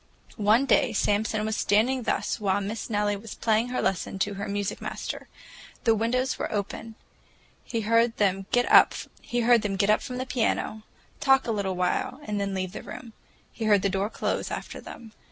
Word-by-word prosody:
One 220 +6 +4
day 250 -3 +3
Samson 215 +1 +1
was 220 0 -1
standing 240 +7 +2
thus 235 - -1
while 200 -1 +1
Miss 205 +2 -4
Nellie 205 -1 +1
was 210 +2 -9
playing 225 +1 +1
her 250 - -2
lesson 195 +1 -1
to 205 +2 -1
her 200 +2 -5
music 205 -1 -3
master. - - -5 0.6
The 225 - +4
windows 250 +4 0
were - - -2
open. 220 +2 -4 0.7
He 230 - -3
heard 230 +2 +2
them 195 -1 +1
get 245 0 +3
up - - +7
from 225 -1 +1
the 255 - -3
piano, 225 -3 -1 0.4
talk 270 -1 +4
a 230 - -1
little 200 -3 -1
while, 180 +8 -1
and 210 -1 -2
then 200 -1 -2
leave 185 -1 -2
the - - -7
room. 230 -3 -9 0.4
He 225 - -5
heard 205 -3 +4
the 200 - +2
door 195 +2 -1
close - - -2
after - - -6
them. 225 -2 -11
215 Hz, 175 wpm, -26 LUFS, 200-230 Hz, 0.7 s, up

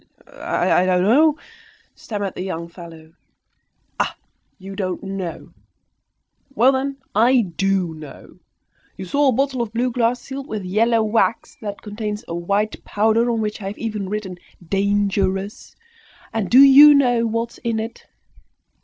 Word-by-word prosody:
"I 180 - +1
don't 180 -1 +2
know," 295 +9 +4 0.6
stammered 205 -4 -5
the - - -7
young 170 -3 -5
fellow. 165 -2 -13 0.9
"Ah! - - -1 0.4
you 195 0 -10
don't 185 -2 -3
know! 195 -3 -6 1.0
Well, 250 +4 +5
then, 275 +1 -2 0.2
I 240 +4 +4
do 195 -3 0
know! 155 -2 -13 0.6
You 190 - -6
saw 285 +10 +1
a - - +5
bottle 265 0 0
of 230 -3 -4
blue 245 +2 0
glass, 240 +1 0
sealed 270 +2 -8
with 215 -3 -5
yellow 225 +4 +2
wax, 225 +1 0
that 205 -2 -7
contains 210 0 -5
a - - -5
white 200 +5 -2
powder, 220 +3 +1
on 230 -2 0
which 210 0 -4
I 195 - -5
have 200 - -6
even 210 -4 -4
written 200 -3 -5 0.3
'Dangerous!' 200 0 -1 0.6
And 215 -4 -2
do 255 +3 +7
you 285 +2 +9
know 245 -4 +2
what 230 +1 -2
is - - -16
in 230 -2 -2
it? 225 +1 -7
215 Hz, 150 wpm, -20 LUFS, 195-235 Hz, 1.0 s, you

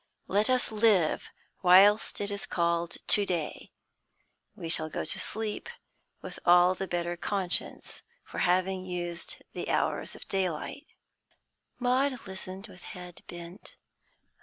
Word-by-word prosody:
Let 205 +4 +2
us 255 -2 +2
live 210 -7 +3 0.3
whilst 195 +5 +6
it 205 0 -1
is 200 0 -3
called 170 -1 0
to 205 - +5
day; 175 -6 -3 0.8
we 165 - -6
shall 160 -1 +3
go - - -3
to 155 - -1
sleep 220 - -3 0.5
with - - -8
all 180 +1 +6
the 190 +1 -4
better 175 -1 -2
conscience 185 0 -2 0.2
for - - -7
having 185 +1 +2
used 175 -2 -5
the - - -4
hours - - 0
of - - -11
daylight." 190 - -2 0.9
Maud 255 0 +1
listened 190 0 -7
with 185 -5 -14
head 180 -1 -10
bent. 175 +4 -9
185 Hz, 130 wpm, -29 LUFS, 175-205 Hz, 0.9 s, whilst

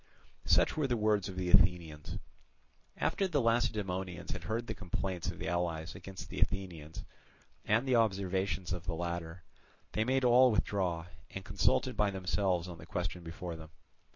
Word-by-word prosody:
Such - - +4
were 155 -3 +1
the 120 -2 +1
words 105 -2 +2
of 95 - -7
the 90 -1 -1
Athenians. 85 -5 +3 0.8
After 195 - +1
the 155 -6 +1
Lacedaemonians 95 - 0
had 90 -2 -5
heard 115 +5 -1
the - - -3
complaints 95 -1 -3
of - - -5
the - - -4
allies 85 -1 -1
against 95 -1 -8
the 95 - -4
Athenians, 90 -5 -2 0.6
and 115 +5 +2
the 125 -2 +4
observations 95 -4 +1
of 90 0 -5
the 85 - -1
latter, 85 0 -4 0.5
they 110 - +1
made 130 +3 +1
all 125 +1 +7
withdraw, 90 -6 0 0.2
and - - -7
consulted - - +2
by 105 0 +3
themselves 95 -2 0
on 85 -2 -8
the 80 - -11
question 90 0 -3
before 85 +1 -6
them. 80 -1 -10
95 Hz, 165 wpm, -33 LUFS, 85-105 Hz, 0.8 s, all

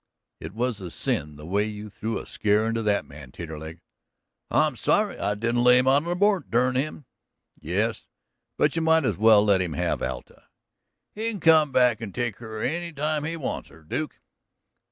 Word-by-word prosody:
"It - - -8
was 120 -3 -1
a 90 - -6
sin 75 -2 -2
the 75 +1 -11
way 100 +5 +1
you 105 0 -6
threw 110 +2 -4
a - - -7
scare 105 +1 +1
into 115 0 -1
that 105 -2 +1
man, 70 -3 -12
Taterleg." 80 +1 -8 0.7
"I'm - - +2
sorry - - +1
I 100 +1 0
didn't 115 +3 0
lay 125 0 +7
him 130 - +3
out 140 +4 +3
on 170 - -2
a - - 0
board, 200 0 +2
dern 125 +2 +2
him!" 145 +2 -2 0.5
"Yes, - - -2 0.5
but 150 - +2
you 165 - 0
might 160 -2 +3
as - - +1
well 110 0 +6
let 100 -3 +3
him 90 -4 -2
have - - -1
Alta." - - -6 0.7
"He 220 +2 -2
can 215 -3 -5
come 160 -3 +5
back 125 -3 +3
and 105 -4 -7
take 120 -4 -2
her 110 -2 -7
any 170 +5 -2
time 150 0 -2
he 165 +1 -3
wants 145 - -4
her, 80 -1 -18
Duke." 150 - -4
115 Hz, 195 wpm, -25 LUFS, 100-150 Hz, 0.7 s, lay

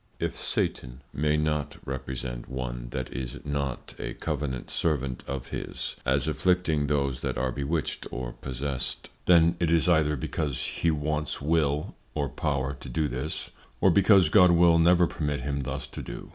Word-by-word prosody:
3. - - 0
_If - - -14
Satan 60 +2 -2
may 75 +1 +2
not 75 -1 -1
represent 65 -2 -5
one - - -4
that 65 0 -4
is 65 +1 -4
not 70 -3 -3
a - - -4
Covenant 70 -5 -3
Servant 70 -6 -1
of 70 -2 -4
his, - - -4
as 70 +3 +2
afflicting 80 -3 +2
those 70 -3 0
that - - -2
are 65 -1 0
bewitched 70 +3 -2
or - - -4
possessed, 65 -1 -4 0.2
then 85 -1 +6
it 85 -2 +2
is 85 -1 +3
either 80 -3 +4
because 70 +1 -2
he 85 - 0
wants 75 -1 -1
Will, 75 -1 +1 0.2
or 70 -3 0
Power 70 -1 -1
to 65 - -8
do 75 +5 0
this, 65 +5 -4 0.3
or 95 - +5
because 95 -2 +6
God 90 0 +7
will 85 -1 +6
never 85 +1 +6
permit 75 -3 -2
him 70 -1 -2
thus 65 - -4
to - - -8
do. - - -8
75 Hz, 170 wpm, -27 LUFS, 65-80 Hz, 0.3 s, God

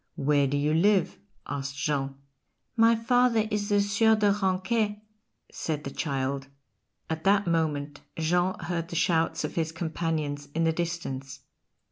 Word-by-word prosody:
"Where 140 0 +2
do 140 +2 0
you 150 +2 +1
live?" 190 +1 +2 0.3
asked 140 0 -4
Jean. 140 -2 -1 0.6
"My 230 0 +5
father 230 -1 +2
is 210 0 -1
the 205 -1 +3
Sieur 210 +2 +3
de 210 -1 +3
Ranquet," 205 +2 0 0.5
said 150 -2 -3
the 140 - -5
child. 135 -2 -2 0.6
At 160 0 -4
that 200 +1 +4
moment 150 -4 -1 0.2
Jean 175 +3 +1
heard 170 -1 -3
the 170 - -7
shouts 165 0 +1
of - - -3
his 160 -1 -1
companions 160 -3 -3
in 165 - +1
the 165 0 +2
distance. 160 -6 -4
165 Hz, 145 wpm, -27 LUFS, 145-205 Hz, 0.6 s, My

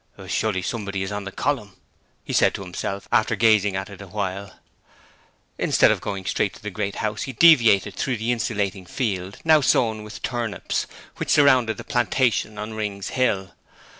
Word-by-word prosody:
'Surely 100 -4 -1
somebody 100 -2 -3
is 95 - -5
on 100 -1 -4
the 100 - -6
column,' 105 -9 -2 0.5
he - - -6
said - - +3
to 100 - -6
himself, 95 +2 -5
after 110 -1 +2
gazing 105 -3 +3
at 95 0 -3
it 100 -1 -11
awhile. 100 0 -5 1.0
Instead - - +4
of - - -1
going 100 -2 -5
straight 100 - -1
to - - -16
the 105 - -4
Great 100 +1 -3
House 105 0 -2
he 135 - -4
deviated 115 - +5
through 125 +4 -2
the 115 +3 -1
insulating 100 -5 -2
field, 95 -4 -3
now 155 -2 +5
sown 110 -5 +2
with 105 - -10
turnips, 120 -4 -2 0.3
which - - -4
surrounded 130 -6 +4
the - - -7
plantation 120 -3 0
on 105 +1 -5
Rings 105 -2 -4
Hill. 100 -7 0
105 Hz, 170 wpm, -23 LUFS, 100-115 Hz, 1.0 s, deviated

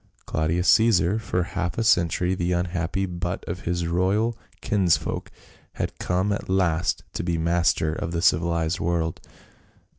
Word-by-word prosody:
Claudius 80 +3 0
Caesar, 110 -3 +4
for 90 -5 -1
half 90 0 -3
a 115 - +1
century 90 -3 +2
the 90 -1 -1
unhappy 90 +1 -1
butt 90 0 -4
of 90 +2 -5
his 85 0 -1
royal 95 +7 +1 0.2
kinsfolk, 95 -5 0 0.4
had - - -4
come 95 +3 0
at 100 - -5
last 90 -3 +1
to - - -3
be 85 -1 -1
master 85 -1 +1
of 80 - -4
the 85 -1 -2
civilized 85 +1 +2
world. 85 -1 -1
90 Hz, 145 wpm, -24 LUFS, 85-95 Hz, 0.4 s, Caesar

